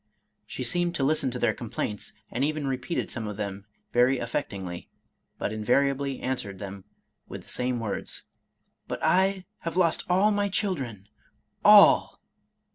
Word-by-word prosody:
She -, -, -5 dB
seemed 175 Hz, -1 st, +1 dB
to 135 Hz, -, 0 dB
listen 140 Hz, -1 st, +2 dB
to 125 Hz, -, -4 dB
their -, -, +2 dB
complaints, 105 Hz, -3 st, -4 dB, 0.2 s
and 125 Hz, -, -1 dB
even 155 Hz, 0 st, -1 dB
repeated 135 Hz, +5 st, -2 dB
some 115 Hz, -3 st, -4 dB
of 105 Hz, -1 st, -5 dB
them 100 Hz, -1 st, -5 dB, 0.3 s
very 125 Hz, +2 st, +4 dB
aflfectinglyj 100 Hz, -8 st, -4 dB, 0.5 s
but 105 Hz, -, -2 dB
invariably 135 Hz, +5 st, +1 dB
answered 115 Hz, -7 st, -3 dB
them 100 Hz, -1 st, -8 dB, 0.4 s
with -, -, -8 dB
the -, -, -17 dB
same 125 Hz, -1 st, -1 dB
words, 110 Hz, -3 st, -4 dB, 0.3 s
" -, -, -49 dB
But -, -, -5 dB
I 190 Hz, 0 st, +2 dB
have 165 Hz, +1 st, -4 dB
lost 170 Hz, -3 st, +3 dB
all 190 Hz, +4 st, +4 dB
my 205 Hz, -1 st, +1 dB
chil 195 Hz, 0 st, +1 dB
dren 115 Hz, -, -7 dB, 0.3 s
— -, -, -44 dB, 0.2 s
all! -, -, +4 dB
130 Hz, 160 wpm, -27 LUFS, 105-165 Hz, 0.5 s, very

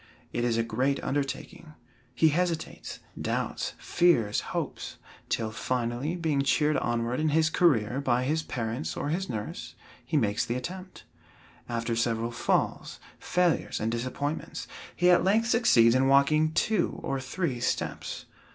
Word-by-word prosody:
It 120 Hz, -, -1 dB
is 120 Hz, -1 st, +1 dB
a 115 Hz, -, +2 dB
great 130 Hz, +5 st, 0 dB
undertaking. 145 Hz, +3 st, -4 dB, 0.4 s
He 160 Hz, +5 st, +5 dB
hesitates, 170 Hz, +1 st, -2 dB, 0.2 s
doubts, -, -, -2 dB
fears, 170 Hz, -13 st, +2 dB
hopes, -, -, -5 dB, 0.3 s
till 110 Hz, -2 st, -1 dB
finally, 120 Hz, +6 st, -2 dB
being 160 Hz, -5 st, 0 dB
cheered 150 Hz, +2 st, +2 dB
onward 120 Hz, +2 st, -1 dB
in 155 Hz, 0 st, +2 dB
his 160 Hz, +1 st, +3 dB
career 130 Hz, -8 st, +2 dB
by 125 Hz, -2 st, +2 dB
his 155 Hz, +5 st, 0 dB
parents 120 Hz, -1 st, -4 dB
or 145 Hz, -, -2 dB
his 180 Hz, +4 st, -2 dB
nurse, 105 Hz, -2 st, -5 dB, 0.3 s
he 155 Hz, -, 0 dB
makes 110 Hz, -3 st, +1 dB
the 120 Hz, -, -2 dB
attempt. 185 Hz, +8 st, -7 dB, 0.7 s
After 115 Hz, 0 st, -1 dB
several 115 Hz, 0 st, 0 dB
falls, 120 Hz, -, -1 dB, 0.2 s
failures, 180 Hz, -2 st, +1 dB
and 110 Hz, +1 st, -1 dB
disappointments, 130 Hz, +6 st, -3 dB, 0.3 s
he 180 Hz, +1 st, +4 dB
at 175 Hz, -, +5 dB
length 220 Hz, +5 st, +2 dB
succeeds 115 Hz, -, +5 dB
in 130 Hz, +1 st, +3 dB
walking 150 Hz, +3 st, +4 dB
two 185 Hz, +3 st, +1 dB
or 135 Hz, 0 st, -1 dB
three 135 Hz, -1 st, -2 dB
steps. 120 Hz, -, -3 dB
135 Hz, 140 wpm, -28 LUFS, 120-160 Hz, 0.7 s, He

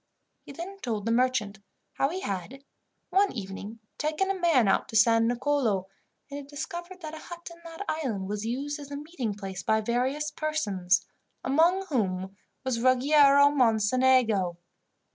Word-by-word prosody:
He -, -, -12 dB
then 360 Hz, +7 st, -8 dB
told 220 Hz, -, -3 dB
the 230 Hz, -, 0 dB
merchant 235 Hz, -4 st, +1 dB, 0.3 s
how 275 Hz, -, +1 dB
he 370 Hz, +4 st, -4 dB
had, 200 Hz, -, -5 dB, 0.5 s
one 390 Hz, +2 st, +3 dB
evening, 200 Hz, 0 st, -7 dB, 0.2 s
taken 310 Hz, +6 st, 0 dB
a 385 Hz, -, -4 dB
man 315 Hz, -, +4 dB
out 195 Hz, -, +2 dB
to -, -, -7 dB
San 225 Hz, +1 st, +5 dB
Nicolo, 240 Hz, -6 st, 0 dB, 0.4 s
and 285 Hz, -, -7 dB
had 280 Hz, -, -10 dB
discovered 345 Hz, +5 st, -7 dB
that 310 Hz, -1 st, -7 dB
a 315 Hz, -, -7 dB
hut 345 Hz, +1 st, -10 dB
in 340 Hz, -, -17 dB
that 330 Hz, +4 st, -7 dB
island 240 Hz, -12 st, -2 dB
was 205 Hz, +1 st, -3 dB
used 275 Hz, +6 st, -3 dB
as 285 Hz, -1 st, -9 dB
a 285 Hz, -, -5 dB
meeting 285 Hz, -, -4 dB
place 195 Hz, -2 st, -6 dB
by 220 Hz, -, +2 dB
various 255 Hz, +7 st, -1 dB
persons, 205 Hz, -, 0 dB, 0.4 s
among 335 Hz, +8 st, +3 dB
whom 190 Hz, -7 st, -1 dB, 0.3 s
was 255 Hz, -3 st, -1 dB
Ruggiero 280 Hz, +2 st, +5 dB
Mocenigo. 225 Hz, -6 st, +3 dB
260 Hz, 160 wpm, -27 LUFS, 215-305 Hz, 0.5 s, San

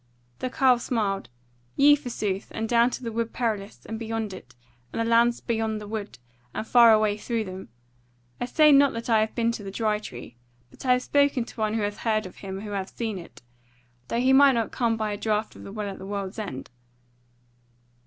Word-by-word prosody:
The 255 Hz, -, -2 dB
carle 255 Hz, -1 st, +3 dB
smiled: 205 Hz, -5 st, -2 dB, 0.5 s
"Yea 290 Hz, +1 st, +7 dB
forsooth, 220 Hz, -8 st, -3 dB
and 225 Hz, 0 st, -2 dB
down 235 Hz, +1 st, +4 dB
to 255 Hz, -, -6 dB
the 230 Hz, -, -3 dB
Wood 230 Hz, 0 st, -2 dB
Perilous, 215 Hz, -5 st, -3 dB
and 220 Hz, 0 st, -5 dB
beyond 225 Hz, -2 st, -3 dB
it, 130 Hz, -9 st, -12 dB, 0.4 s
and -, -, -4 dB
the 230 Hz, -, +1 dB
lands 235 Hz, +1 st, +3 dB
beyond 220 Hz, -2 st, -1 dB
the 210 Hz, -, -9 dB
Wood; 210 Hz, -1 st, -5 dB, 0.4 s
and -, -, -3 dB
far 235 Hz, 0 st, +7 dB
away 215 Hz, -1 st, +3 dB
through 230 Hz, +1 st, -2 dB
them. 185 Hz, -, -8 dB, 0.7 s
I -, -, -1 dB
say 305 Hz, +4 st, +5 dB
not 280 Hz, -1 st, +6 dB
that 230 Hz, +1 st, -4 dB
I 220 Hz, -, +5 dB
have 220 Hz, 0 st, -1 dB
been 230 Hz, -1 st, +1 dB
to 225 Hz, -, -6 dB
the 195 Hz, -, -6 dB
Dry 210 Hz, +1 st, 0 dB
Tree; 120 Hz, -, -10 dB, 0.3 s
but -, -, -9 dB
I 250 Hz, -, +6 dB
have 250 Hz, 0 st, 0 dB
spoken 280 Hz, -4 st, +2 dB
to 230 Hz, -, -9 dB
one 215 Hz, 0 st, 0 dB
who 220 Hz, -, 0 dB
hath 205 Hz, 0 st, -2 dB
heard 215 Hz, -2 st, 0 dB
of 185 Hz, -, -10 dB
him 195 Hz, -1 st, -6 dB
who 210 Hz, -1 st, -7 dB
hath 195 Hz, -1 st, -5 dB
seen 220 Hz, -5 st, -2 dB
it; 170 Hz, -, -13 dB, 0.6 s
though 235 Hz, -, -1 dB
he 260 Hz, +2 st, +4 dB
might 275 Hz, 0 st, +7 dB
not 230 Hz, -2 st, -1 dB
come 230 Hz, -2 st, 0 dB
by 215 Hz, -1 st, -2 dB
a 205 Hz, -, -3 dB
draught 215 Hz, +1 st, -1 dB
of -, -, -12 dB
the -, -, -9 dB
Well 210 Hz, 0 st, -4 dB
at 195 Hz, -, -8 dB
the 190 Hz, -, -8 dB
World's 200 Hz, 0 st, -4 dB
End." 135 Hz, -14 st, -6 dB
220 Hz, 220 wpm, -26 LUFS, 205-235 Hz, 0.7 s, Yea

